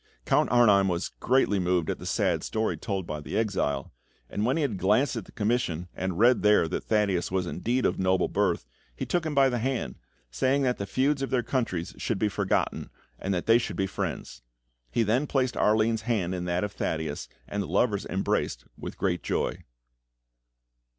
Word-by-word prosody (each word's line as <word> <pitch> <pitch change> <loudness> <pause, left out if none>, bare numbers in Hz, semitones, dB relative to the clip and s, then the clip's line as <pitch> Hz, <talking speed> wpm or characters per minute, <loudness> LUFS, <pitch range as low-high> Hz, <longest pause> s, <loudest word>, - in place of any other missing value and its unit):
Count - - +3
Arnheim 105 -5 +5
was 85 -1 -1
greatly 125 -6 +2
moved 90 -2 +1
at - - -2
the - - -7
sad - - +1
story 110 0 -1
told 95 -4 -3
by 75 -2 -4
the - - -4
exile, 95 - -1 0.4
and 105 - -1
when 130 - +1
he 160 - +1
had 110 -9 -1
glanced 110 +9 +2
at 110 -5 -4
the - - -15
commission 105 -6 -1
and 95 -2 -3
read 120 +3 +5
there 105 -5 +4
that 90 - -4
Thaddeus 100 -5 +1
was 95 -1 0
indeed 120 +9 -1
of - - +1
noble 95 0 +2
birth, - - 0 0.3
he - - -4
took 175 -2 0
him 150 - -3
by 135 -1 +6
the 125 -2 0
hand, 120 - -2 0.3
saying 130 - +1
that 125 -2 0
the 100 - -3
feuds 135 +4 +1
of 135 - -2
their 130 -3 +1
countries 105 -11 -2
should 115 - -1
be 105 +1 +1
forgotten, 100 -1 -1 0.3
and 95 - -2
that 90 -2 -1
they 115 +1 +6
should - - -4
be 95 - 0
friends. 60 -8 -4 0.5
He 115 - +1
then 120 +7 +1
placed 130 -3 0
Arline's 110 +1 +2
hand 105 -6 -1
in 90 -1 -3
that 90 +1 0
of 105 - -2
Thaddeus, 80 -6 -3 0.2
and 100 - -2
the 100 - -4
lovers 100 +3 +1
embraced 75 -9 -1
with - - -8
great - - 0
joy. - - -2
105 Hz, 195 wpm, -27 LUFS, 90-120 Hz, 0.5 s, by